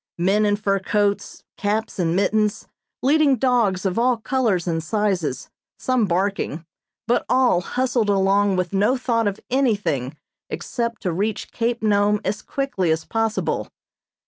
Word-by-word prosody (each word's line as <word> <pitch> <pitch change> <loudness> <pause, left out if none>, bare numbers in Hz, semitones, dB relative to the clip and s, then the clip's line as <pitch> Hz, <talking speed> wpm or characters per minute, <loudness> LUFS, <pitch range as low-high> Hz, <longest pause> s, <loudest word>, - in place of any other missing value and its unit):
Men 200 +5 +2
in 205 - +2
fur 200 -1 0
coats, 205 +1 -1
caps 210 0 -2
and 170 -1 +1
mittens, 210 +2 +1 0.4
leading 285 0 +4
dogs 230 -7 +1
of 190 +3 0
all 245 0 +3
colors 225 -6 0
and 165 -1 -1
sizes, 185 - -1 0.3
some 255 -4 +1
barking, 180 -3 -1 0.4
but 240 - +2
all 250 -8 +3
hustled 245 0 0
along 200 0 +3
with 185 0 -2
no 210 +7 +2
thought 230 -3 0
of 200 0 -2
anything 205 - 0 0.3
except 235 -2 -4
to 180 - 0
reach 205 +5 -2
Cape 235 0 -2
Nome 205 0 +3
as 210 +3 -2
quickly 270 -11 -2
as 160 0 0
possible. 225 -1 -1
205 Hz, 145 wpm, -22 LUFS, 190-235 Hz, 0.4 s, leading